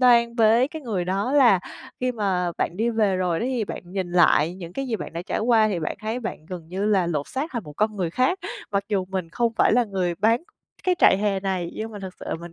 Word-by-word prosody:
đoan 235 -2 +5
với 230 +3 +4
cái 315 -1 -8
người 200 -8 -2
đó 195 +8 -1
là 240 -10 +6 0.4
khi 255 0 0
mà 185 -5 0
bạn 175 - -1
đi 230 +3 +1
về 210 -4 +2
rồi 180 -3 0
đó 240 - -1
thì 245 -5 -1
bạn - - -6
nhìn 180 -1 -4
lại 175 -1 +4
những 175 -2 -9
cái 270 +4 -3
gì 225 -3 -1
bạn - - -7
đã 170 +1 -4
trải - - -2
qua 220 -1 +4
thì 180 -5 -2
bạn 155 - -3
thấy 220 +3 -3
bạn 160 -9 -6
gần 175 -3 -8
như 195 +3 -2
là 195 -5 +3
lột 150 -4 -2
xác 280 +5 -3
thành 235 -5 -3
một 150 - -9
con 215 +5 0
người 175 -4 -1
khác, 255 - +1 0.3
mặc 200 -1 0
dù 195 -3 0
mình 185 -3 -3
không 235 +4 0
phải - - +4
là 245 +1 +4
người 185 -4 -1
bán 225 - +2 0.4
cái 365 -1 +3
trại - - +6
hè 200 -2 0
này. 185 -3 -2
Nhưng 220 +1 -5
mà 205 - -7
thực 190 -1 -7
sự - - -8
là - - -1
mình 170 0 -9
200 Hz, 270 wpm, -24 LUFS, 180-235 Hz, 0.4 s, là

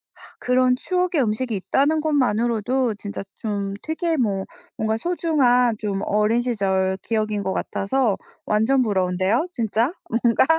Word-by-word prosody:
아 - - -23 0.2
그런 250 0 +3
추억의 360 +2 0
음식이 230 0 -1
있다는 280 +10 +1
것만으로도 245 -4 +1
진짜 205 0 -6 0.2
좀 200 -2 -3
되게 325 +1 -1
뭐 200 -7 0 0.3
뭔가 220 0 0
소중한 255 -7 +2
좀 205 -3 -3
어린 210 +3 +2
시절 190 -5 0
기억인 215 -2 -1
것 190 0 -1
같아서 225 0 0 0.3
완전 220 +6 +2
부러운데요 190 - +1
진짜 230 +3 0 0.2
뭔가? 230 +1 +3
230 Hz, 290 characters per minute, -22 LUFS, 205-260 Hz, 0.3 s, 그런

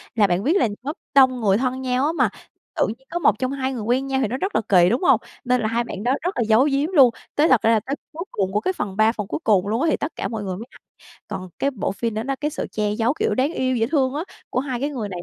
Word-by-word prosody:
là 210 -3 +4
bạn 180 +2 0
biết 335 +8 +3
là 310 - +3 0.2
lớp 295 +3 -3 0.2
đông 260 -2 +5
người 200 -2 +3
thân 260 +1 -1
nhau 255 +1 0
á, 310 - +1
mà 335 - +2 0.5
tự - - +3
nhiên 255 +5 -8
có 345 - -2
một 220 - +3
trong 260 0 -1
hai 265 -1 -2
người 235 - -4
quen 250 +5 0
nhau 265 0 0
thì 240 - +1
nó 255 +5 -3
rất 385 +7 -3
là - - +3
kỳ, 180 -2 +6
đúng 250 - 0
hông? - - +5 0.2
Nên 250 -1 +1
là 220 - 0
hai 235 +2 0
bạn 205 -3 -7
đó 250 +2 +2
rất 360 -1 -3
là 235 - +2
giấu 225 +5 +5
giếm 280 +3 +1
luôn. 275 -9 +7 0.3
Tới 300 +2 +4
thật 255 -5 +5
ra 225 - +3
là 220 - +4
tới 270 +7 -4 0.2
cuối 330 +3 -5
cùng 190 -1 -1
của 210 - +1
cái 375 - 0
phần 195 - -4
3 220 +1 +5
phần 210 -4 -5
cuối - - -3
cùng 200 -3 +3
luôn 225 +5 0
á, 330 - +2
thì - - +1
tất 305 - -4
cả - - -3
mọi 220 -3 -4
người 185 -2 -3
mới 225 - -7
hay, - - -17 0.5
còn 190 -3 -6
cái 280 - +1
bộ 220 - -2
phin 225 +3 -3
nó 250 +6 -2
cái 300 +1 -1
sự - - -4
che 210 -1 -1
giấu, 230 +5 +1
kiểu, 440 +6 -1
đáng 275 +5 +1
yêu, 255 0 0
dễ 225 -1 +1
thương 270 -3 +1
á, 315 - -2 0.3
của 250 - 0
hai 260 -3 -3
cái 285 - -1
người 235 -8 -4
này 180 - -6
250 Hz, 315 wpm, -22 LUFS, 215-275 Hz, 0.5 s, luôn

